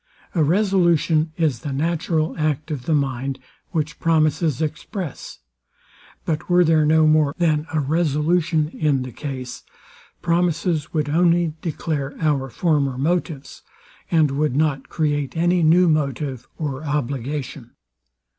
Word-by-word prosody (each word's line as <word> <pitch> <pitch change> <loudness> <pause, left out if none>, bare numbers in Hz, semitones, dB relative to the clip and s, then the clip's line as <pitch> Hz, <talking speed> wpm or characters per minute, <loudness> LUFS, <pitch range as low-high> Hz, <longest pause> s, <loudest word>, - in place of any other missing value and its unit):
A 165 - +2
resolution 170 -3 +2
is 155 -8 +1
the 140 +4 -5
natural 160 +2 -1
act 155 0 -1
of 135 -5 -5
the 160 - +3
mind, 135 -1 -1 0.3
which 160 -3 -3
promises 155 -2 +1
express: 160 - -5 0.9
But 155 +1 -3
were 180 0 +5
there 160 -2 +3
no 160 0 +4
more 155 -1 +3
than 160 -3 +1
a 160 - 0
resolution 155 +1 +1
in 145 -5 0
the 130 - -7
case, 130 0 -6 0.6
promises 170 -2 0
would 155 -2 -1
only 170 +1 +2
declare 150 -4 -3
our 145 -4 0
former 140 -3 0
motives, 160 0 -2 0.5
and 160 -4 +3
would 145 -1 0
not 145 -2 0
create 145 -1 -1
any 175 +1 +2
new 170 +3 +5
motive 140 -4 -1
or 145 -2 -4
obligation. 140 -1 -4
155 Hz, 125 wpm, -22 LUFS, 140-165 Hz, 0.9 s, were